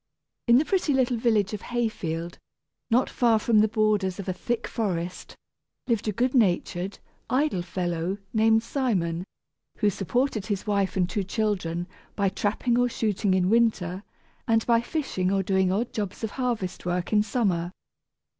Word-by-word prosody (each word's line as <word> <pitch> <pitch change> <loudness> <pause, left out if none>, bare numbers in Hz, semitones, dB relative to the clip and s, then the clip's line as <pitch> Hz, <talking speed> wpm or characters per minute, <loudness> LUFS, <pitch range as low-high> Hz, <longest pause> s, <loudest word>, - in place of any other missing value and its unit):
] - - -58
In 235 +1 +7
the 295 - +3
pretty 355 -7 +1
little 255 -2 +2
village 220 -3 +2
of 210 - -4
Hayfield, 175 -9 -3 0.5
not 245 +2 +3
far 235 -3 +3
from 215 0 +3
the 215 - +5
borders 210 -4 +1
of 200 - -6
a 185 - 0
thick 235 +5 -2
forest, 180 -6 -3 0.5
lived 230 -3 0
a - - +2
good 245 +5 0
natured, 190 -4 +1 0.3
idle 260 -6 +1
fellow, 175 +1 -2 0.2
named 220 0 +4
Simon, 190 - -1 0.5
who 210 -2 +2
supported 215 +3 -1
his 205 -3 -2
wife 200 -2 0
and 180 -2 +2
two 195 +2 -2
children 185 -4 -1 0.3
by 200 -2 +2
trapping 225 +5 0
or 245 0 +3
shooting 210 -4 0
in 180 -1 +2
winter, 195 -5 +2 0.5
and 225 -1 +3
by 230 -1 +4
fishing 235 - -2
or 195 -1 +1
doing 190 -1 +2
odd 225 +5 -1
jobs 205 0 -4
of 220 - -2
harvest 240 -8 -2
work 180 +2 -2
in 210 - +5
summer. 195 -6 0
210 Hz, 165 wpm, -26 LUFS, 185-235 Hz, 0.5 s, In